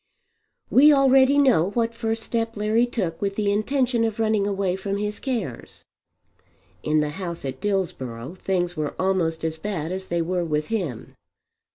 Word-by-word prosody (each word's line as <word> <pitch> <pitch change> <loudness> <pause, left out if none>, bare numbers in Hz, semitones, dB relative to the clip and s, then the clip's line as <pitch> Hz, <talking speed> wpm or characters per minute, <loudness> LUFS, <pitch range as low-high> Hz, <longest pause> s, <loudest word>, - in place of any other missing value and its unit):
We 295 +4 +7
already 270 0 +5
know 250 - +4
what 230 -1 +1
first 225 -1 -2
step 230 -1 -2
Larry 220 +3 +2
took 185 -9 -3
with 200 -1 -1
the 205 -1 +1
intention 240 +3 +1
of 225 -1 -2
running 215 -2 +1
away 195 -2 0
from 195 +1 -3
his 210 +1 -2
cares. 225 - -5 1.0
In 155 0 +2
the 150 0 -1
house 170 -5 -5
at 135 - -5
Dillsborough 145 - -3
things 180 -2 -2
were 155 -2 -3
almost 175 -4 0
as 160 0 -3
bad 175 -4 -3
as 190 0 -4
they 170 -1 0
were 180 +1 -1
with 150 -2 -2
him. 180 - -3
195 Hz, 165 wpm, -24 LUFS, 170-225 Hz, 1.0 s, We